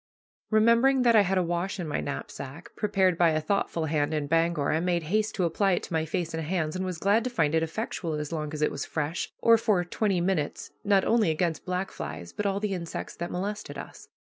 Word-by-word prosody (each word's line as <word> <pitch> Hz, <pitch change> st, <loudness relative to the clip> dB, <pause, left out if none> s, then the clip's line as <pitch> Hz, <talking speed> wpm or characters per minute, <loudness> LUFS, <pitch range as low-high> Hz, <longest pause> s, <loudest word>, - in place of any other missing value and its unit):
Remembering 235 Hz, +4 st, +4 dB
that 235 Hz, -2 st, +5 dB
I 215 Hz, -, +8 dB
had 190 Hz, -1 st, +1 dB
a 185 Hz, -, +3 dB
wash 175 Hz, +3 st, -2 dB
in 175 Hz, -, -3 dB
my 145 Hz, -, -1 dB
knapsack, 140 Hz, +2 st, -7 dB
prepared 190 Hz, -4 st, +1 dB
by 170 Hz, -1 st, +6 dB
a 155 Hz, -1 st, +1 dB
thoughtful 165 Hz, -1 st, -1 dB
hand 155 Hz, 0 st, 0 dB
in 150 Hz, -1 st, -1 dB
Bangor, 165 Hz, -1 st, +1 dB
I 155 Hz, -, +2 dB
made 175 Hz, -1 st, 0 dB
haste 215 Hz, +7 st, 0 dB
to 190 Hz, -, 0 dB
apply 195 Hz, +3 st, +2 dB
it -, -, -1 dB
to -, -, -7 dB
my 160 Hz, -1 st, +1 dB
face 165 Hz, 0 st, -2 dB
and 160 Hz, -, -2 dB
hands, 160 Hz, -1 st, -1 dB
and 185 Hz, -, -2 dB
was 185 Hz, -2 st, -3 dB
glad 205 Hz, +6 st, +3 dB
to -, -, 0 dB
find 160 Hz, -11 st, +1 dB
it 160 Hz, -, +3 dB
effectual, 165 Hz, -1 st, -3 dB
as 150 Hz, 0 st, -4 dB
long 155 Hz, -2 st, -3 dB
as 155 Hz, -1 st, -2 dB
it -, -, +2 dB
was 145 Hz, -, -4 dB
fresh, 160 Hz, +2 st, -3 dB
or 230 Hz, -1 st, +5 dB
for 205 Hz, -6 st, +2 dB
twenty 195 Hz, +1 st, 0 dB
minutes, 170 Hz, -4 st, -1 dB
not 200 Hz, -2 st, +3 dB
only 225 Hz, -5 st, +3 dB
against 160 Hz, 0 st, -1 dB
black 185 Hz, +1 st, -2 dB
flies, 80 Hz, +4 st, -7 dB
but 210 Hz, -, -1 dB
all 195 Hz, 0 st, 0 dB
the 205 Hz, -1 st, -1 dB
insects 170 Hz, -3 st, -5 dB
that 175 Hz, +1 st, -4 dB
molested 205 Hz, +4 st, -4 dB
us. -, -, -10 dB
175 Hz, 235 wpm, -27 LUFS, 160-200 Hz, -, I